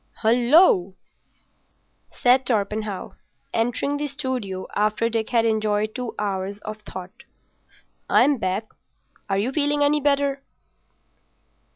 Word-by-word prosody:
"Hullo!" 235 - +4 1.2
said 255 +1 +3
Torpenhow, 210 -3 -2 0.4
entering 245 +5 0
the 295 0 -2
studio 255 -10 -4
after 215 +2 +1
Dick 225 -1 -2
had 230 -2 +2
enjoyed 215 -1 0
two 250 -2 -5
hours 200 -1 -3
of 215 0 -7
thought. 185 -2 -10 0.8
"I'm 285 -1 +4
back. 200 +1 -2 0.6
Are 195 - +1
you 220 +6 0
feeling 290 0 +1
any 295 +1 +2
better?" 280 -1 +1
225 Hz, 105 wpm, -23 LUFS, 205-275 Hz, 1.2 s, Hullo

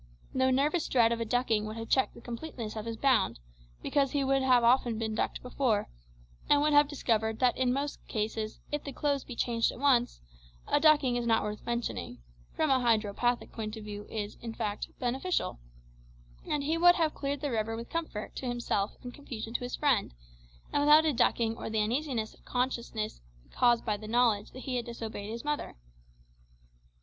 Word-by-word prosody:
No 260 0 +3
nervous 290 +5 +2
dread 235 -3 +4
of 230 0 -1
a - - 0
ducking 230 -2 +1
would 215 +1 -6
have 225 0 -5
checked 265 - +2
the - - -12
completeness 235 -3 -6
of 215 +1 -5
his 230 -1 -4
bound, 260 -2 +2 0.5
because 280 -1 +1
he 285 -1 +1
would 270 0 +2
have 255 -2 +4
often 240 -1 +3
been 220 -1 -2
ducked 215 - -2
before, 250 -4 0 0.6
and 290 - +6
would 300 +1 +2
have 290 0 +6
discovered 225 -6 0
that 250 0 +3
in 255 -1 +1
most 280 +3 -3
cases, 215 0 -3
if 295 0 -2
the 280 - -6
clothes 285 -2 0
be 245 - -8
changed 230 -1 +1
at - - -10
once, 250 -3 +2 0.5
a - - +3
ducking 290 -5 +4
is 240 -1 -2
not 225 -1 +3
worth 210 0 -5
mentioning 235 0 -3 0.4
from 310 -3 +1
a 265 - +4
hydropathic 235 0 +1
point 220 -1 -5
of 220 - -8
view 205 0 -7
is, 210 -2 -4
in 230 -1 -6
fact, 205 0 -3
beneficial 260 - -1 0.9
and 295 -2 0
he 320 +3 0
would 350 +1 +7
have 320 -3 +1
cleared 280 0 -3
the 290 -2 -2
river 225 0 -1
with 230 +1 -6
comfort 320 -11 -4
to 260 - -4
himself 240 -4 -1
and 245 -1 -7
confusion 230 -5 -7
to - - 0
his 245 - -3
friend, 285 - +1 0.6
and 290 - +2
without 300 +2 +7
a 310 - +2
ducking 230 -2 +2
or - - -6
the 220 - -2
uneasiness 235 0 -1
of - - -23
conscience 235 - -2 0.3
caused 240 -2 +3
by 215 -3 +1
the 215 +1 -9
knowledge 225 -3 +2
that 260 - -10
he 255 -2 -2
had 240 - -3
disobeyed 220 -3 -6
his 230 +4 -6
mother. 295 0 -2
245 Hz, 195 wpm, -30 LUFS, 225-275 Hz, 0.9 s, would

